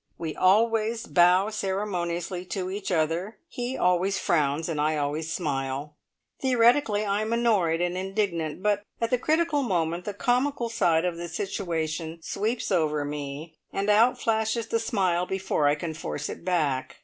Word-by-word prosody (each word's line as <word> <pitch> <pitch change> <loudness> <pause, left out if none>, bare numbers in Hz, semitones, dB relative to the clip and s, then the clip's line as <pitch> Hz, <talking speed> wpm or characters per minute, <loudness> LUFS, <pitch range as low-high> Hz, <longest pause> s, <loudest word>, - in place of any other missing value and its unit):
We 160 -2 -4
always 225 +3 +2
bow 180 +4 +4
ceremoniously 185 -3 -2
to 185 0 -3
each 200 0 -4
other; 170 +6 0
he 250 -3 -4
always 180 +2 +2
frowns, 150 -1 +1
and 155 -3 -1
I 155 +1 +1
always 150 +3 -2
smile. 140 -2 -3 0.5
Theoretically 240 -4 +3
I 200 +1 0
am 215 +1 -2
annoyed 205 -9 +2
and 175 0 0
indignant; 185 -4 -2
but 205 -1 +2 0.2
at 230 0 -1
the 250 - +2
critical 310 +1 +1
moment 175 -7 -1
the 205 - -4
comical 250 +1 0
side 170 -7 +2
of 175 -2 -1
the 170 0 -5
situation 165 -3 -3
sweeps 225 +3 -2
over 150 -5 +1
me, 145 +2 -6 0.2
and 200 +2 0
out 230 +4 +4
flashes 220 0 0
the 230 - +1
smile 185 -6 0
before 190 -6 0
I 145 - +4
can 160 +1 -4
force 150 -2 -4
it - - -7
back. 150 -8 0
185 Hz, 160 wpm, -26 LUFS, 160-215 Hz, 0.5 s, bow